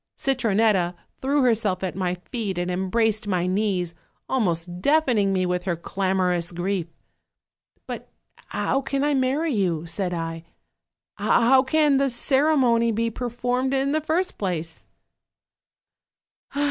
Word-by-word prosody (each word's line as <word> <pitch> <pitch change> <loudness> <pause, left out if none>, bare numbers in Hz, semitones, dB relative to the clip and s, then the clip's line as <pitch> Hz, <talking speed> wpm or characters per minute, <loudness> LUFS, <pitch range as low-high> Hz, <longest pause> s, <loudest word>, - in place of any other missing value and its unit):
Citronetta 215 -8 +2 0.3
threw 280 +1 +2
herself 215 -6 +1
at 185 - -2
my 180 -2 -1
feet 190 +2 -5
and 175 +1 -1
embraced 210 +4 0
my 180 -3 0
knees, 185 -2 0 0.3
almost 175 -7 -1
deaf 310 +7 +3
ening 215 -6 +2
me 190 -1 +1
with 180 0 -1
her 175 -3 0
clamorous 180 -1 0
grief. 175 0 -2 1.0
'But - - -7 0.4
how 270 - 0
can 275 0 -2
I 295 0 +2
marry 275 +4 +1
you?' 175 -6 0
said 180 +2 -2
I, 165 -1 -4 0.7
'how 260 +3 +4
can 290 +1 +3
the 275 0 +2
ceremony 255 -3 +3
be 230 +1 -1
per 245 +2 -4
formed, 250 +3 -1
in 270 +1 +1
the 310 +1 +1
first 330 +5 -1
place?' 170 -4 -4
210 Hz, 135 wpm, -24 LUFS, 180-265 Hz, 1.0 s, how